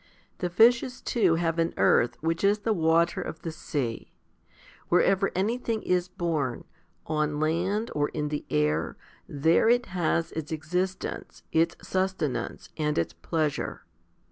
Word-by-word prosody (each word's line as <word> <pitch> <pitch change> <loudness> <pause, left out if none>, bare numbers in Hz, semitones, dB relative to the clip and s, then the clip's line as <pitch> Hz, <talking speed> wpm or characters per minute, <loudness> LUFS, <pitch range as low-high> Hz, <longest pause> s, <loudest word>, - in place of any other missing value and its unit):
The 180 - -1
fishes 235 +6 +4
too 195 -9 +2
have 165 0 0
an 165 0 0
"earth," 120 - +3
which 165 +2 -1
is 200 +1 +4
the 220 +1 0
water 165 -1 +2
of 160 - -7
the 165 - -3
sea. 135 -7 -4 0.8
Wherever 195 +2 +3
anything 225 +3 -1
is 180 -1 +1
born, 160 -9 -2 0.4
on 150 -1 -1
land 180 +8 0
or 145 -1 0
in 150 -1 -3
the 150 0 -3
air, 75 +2 0 0.3
there 160 +9 +3
it 245 +1 +3
has 170 -2 0
its 160 -1 -5
existence, 180 +4 -3
its 165 +1 +2
susten 190 -7 -1
ance, - - -6
and 150 -1 0
its 85 - 0
pleasure. 155 -3 -2
165 Hz, 140 wpm, -27 LUFS, 150-190 Hz, 0.8 s, fishes